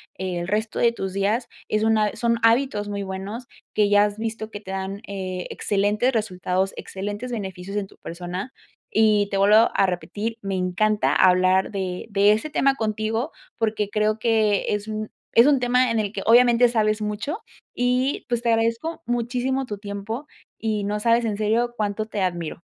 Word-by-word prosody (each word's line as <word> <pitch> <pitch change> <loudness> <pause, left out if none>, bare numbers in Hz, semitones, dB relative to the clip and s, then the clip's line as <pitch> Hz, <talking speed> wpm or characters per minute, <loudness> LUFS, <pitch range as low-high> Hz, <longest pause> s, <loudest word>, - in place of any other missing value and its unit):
el 180 -2 -3
resto 215 +2 -1
de 235 0 +4
tus 190 -4 -4
días. 205 +5 0 0.2
Es 215 0 0
una 215 -2 +2
son 235 -1 +1
hábitos 230 -2 +2
muy 200 -1 -3
buenos 195 +5 -6 0.3
que 210 -1 +3
ya 205 0 +5
has 205 0 -4
visto 220 0 -4
que 205 -1 -8
te 190 - -8
dan, 195 +1 -4
eh, 185 -2 -4
excelentes 210 +5 +1
resultados, 190 -3 -1
excelentes 205 +6 -5
beneficios 190 -2 -5
en 205 -2 -2
tu - - -20
persona. 180 +7 -6 0.4
Y 215 -2 +4
te 195 - -3
vuelvo 210 +3 +6
a 195 - +3
repetir, 210 +5 -3
me 195 -1 -3
encanta 195 +4 +1
hablar 185 +1 +4
de 185 -2 -3
de 200 0 +4
ese 220 +9 0
tema 275 -2 +2
contigo, 220 +4 -2 0.3
porque, 215 -2 -1
creo 215 +1 0
que 215 -3 +2
es 205 +1 -3
un 215 0 -4 0.2
es 235 +5 +7
un 280 -3 +4
tema 250 0 +2
en 225 - +1
el 205 -1 -2
que - - -3
obviamente 240 +1 +6
sabes 215 -2 +1
mucho, 210 - -3 0.3
y 250 +3 0
pues, 240 -1 0
te 235 - 0
agradezco 230 +9 -1
muchísimo 245 +3 -1
tu 205 -5 -6
tiempo 210 +7 -5 0.3
y 215 -2 -1
no 210 +1 -1
sabes 235 +1 +3
en 215 -2 -1
serio 230 +3 +1
cuánto 215 -1 -2
te 210 -2 -4
admiro. 175 -3 -2
215 Hz, 180 wpm, -23 LUFS, 200-230 Hz, 0.4 s, es